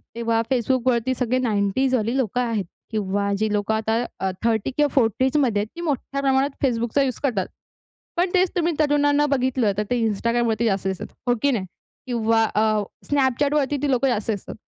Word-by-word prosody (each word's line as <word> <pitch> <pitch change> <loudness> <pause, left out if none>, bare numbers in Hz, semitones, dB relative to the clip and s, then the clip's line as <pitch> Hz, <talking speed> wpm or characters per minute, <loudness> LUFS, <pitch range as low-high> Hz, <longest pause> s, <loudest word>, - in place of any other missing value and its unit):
तेव्हा 230 -1 +1
Facebookवरती 255 0 +1
सगळे 250 0 +1
90s 235 +3 +1
वाली 230 +1 0
लोकं 250 -1 0
आहेत. 225 -5 -1 0.3
किंवा 200 -1 -1
जे 215 0 0
लोकं 210 +1 0
आता 220 +1 0 0.2
अ, 190 - 0
30 225 -1 +1
किंवा 295 0 +4
40s 260 +3 +2
मध्ये 245 -8 +2
आहेत, 210 - -4
ती 340 - -6
मोठ्या 275 -3 -2
प्रमाणात 270 0 +1
Facebookचा 240 +2 +1
यूज 260 -2 -2
करतात. 225 -10 0 0.7
पण 355 +2 +2
तेच 370 0 +3
तुम्ही 345 -1 +1
तरुणांना 290 -1 +3
बघितलं, 255 -4 +1
तर 210 - +1
ते 245 -1 +1
Instagramवरती 230 +1 0
जास्त 195 -3 0
दिसतात, 190 -1 -3 0.2
हो 245 - +3
की 285 - +3
नाही? 215 -7 -1 0.4
किंवा 225 -2 +2
अ, 215 +1 +3 0.5
Snapchatवरती 285 +1 +1
ती 285 - +1
लोकं 260 +1 +2
जास्त 225 -2 -1
दिसतात. 200 -3 -6
240 Hz, 175 wpm, -23 LUFS, 220-270 Hz, 0.7 s, किंवा